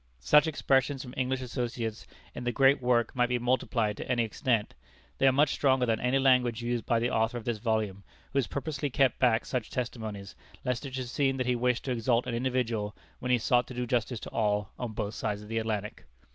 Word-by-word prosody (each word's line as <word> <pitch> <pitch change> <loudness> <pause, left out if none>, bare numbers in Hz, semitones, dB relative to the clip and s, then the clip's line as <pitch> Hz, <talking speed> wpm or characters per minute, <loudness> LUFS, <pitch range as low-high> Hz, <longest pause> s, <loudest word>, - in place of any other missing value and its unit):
Such 150 - +5
expressions 135 -3 +1
from 125 -2 -9
English 130 0 -1
associates 120 -3 -4 0.3
in - - -6
the 120 - 0
great 135 +2 +4
work 120 -2 +1
might 125 -1 +2
be 125 - +1
multiplied 120 -3 0
to - - -6
any 120 -1 +2
extent. 115 0 0 0.5
They 135 - +5
are - - +7
much 145 +2 +3
stronger 130 -2 +2
than 115 -2 +1
any 125 +2 +2
language 125 -3 +3
used 120 -2 -2
by 115 - +3
the 120 +2 0
author 115 +2 +1
of 115 - -8
this 115 -3 -1
volume, 110 -3 -1 0.3
who 140 - +3
has 130 - 0
purposely 145 0 -3
kept 130 -1 +2
back 120 -3 +3
such 125 -4 -3
testimonies, 110 -5 -5 0.3
lest 125 +2 -1
it 135 - -7
should 130 -2 -4
seem 135 +1 +1
that 130 - -1
he 125 0 +1
wished 125 0 0
to 130 - -1
exalt 120 0 +1
an 125 - -3
individual, 115 -4 -1 0.2
when 125 - -4
he 125 - +5
sought 120 +2 +2
to 130 - -9
do 125 0 -2
justice 120 -1 -1
to - - -8
all, 105 -2 0
on 120 -3 -4
both 105 -1 -3
sides 105 -1 -3
of 105 - -12
the 115 0 0
Atlantic. 110 -2 -3
120 Hz, 225 wpm, -29 LUFS, 115-130 Hz, 0.5 s, are